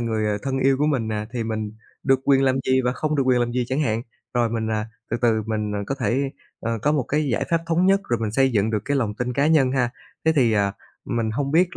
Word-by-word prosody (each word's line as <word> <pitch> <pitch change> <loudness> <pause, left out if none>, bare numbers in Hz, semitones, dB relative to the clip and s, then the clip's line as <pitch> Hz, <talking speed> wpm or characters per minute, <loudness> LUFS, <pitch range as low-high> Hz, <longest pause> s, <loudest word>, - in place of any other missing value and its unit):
người, 110 -2 -1
ờ, 105 -1 0
thân 135 -1 -1
yêu 135 0 +3
của 150 - +2
mình 130 -7 0
nè 105 -1 -2
thì 120 -3 -2
mình 110 -1 -3 0.3
được 135 -1 +3
quyền 135 -1 +4
làm 130 -1 +3
gì 130 0 +4
và 125 - +2
không 155 +3 -1
được 140 - +3
quyền 125 -1 +4
làm 120 0 0
gì 125 0 0
chẳng 130 +3 0
hạn, 115 -6 0 0.3
rồi 120 -1 +2
mình, 110 -1 -2
à, 110 0 -1 0.2
từ - - +1
từ 110 -2 +3
mình, 105 -1 -2
ờ, 105 - -2
có 135 - -1
thể, 130 +4 0 0.3
ờ, 115 0 -2
có 150 - +3
một 150 -3 +2
cái 150 0 +1
giải 105 - 0
pháp 165 -1 +3
thống 170 +2 +2
nhất 195 +1 +4
rồi 120 - +1
mình 110 -2 -1
xây 135 +3 +3
dựng 105 0 +2
được 105 -3 -1
cái 145 - 0
lòng 110 -6 0
tin 125 +3 -2
cá 140 +4 +2
nhân 145 -5 +4
ha. 125 -3 +1 0.3
Thế 160 - +4
thì, 120 -5 +4
à, 100 -2 +2 0.3
mình 115 -2 -1
hông 140 +5 -2
biết 175 +3 +3
125 Hz, 280 wpm, -23 LUFS, 110-140 Hz, 0.3 s, quyền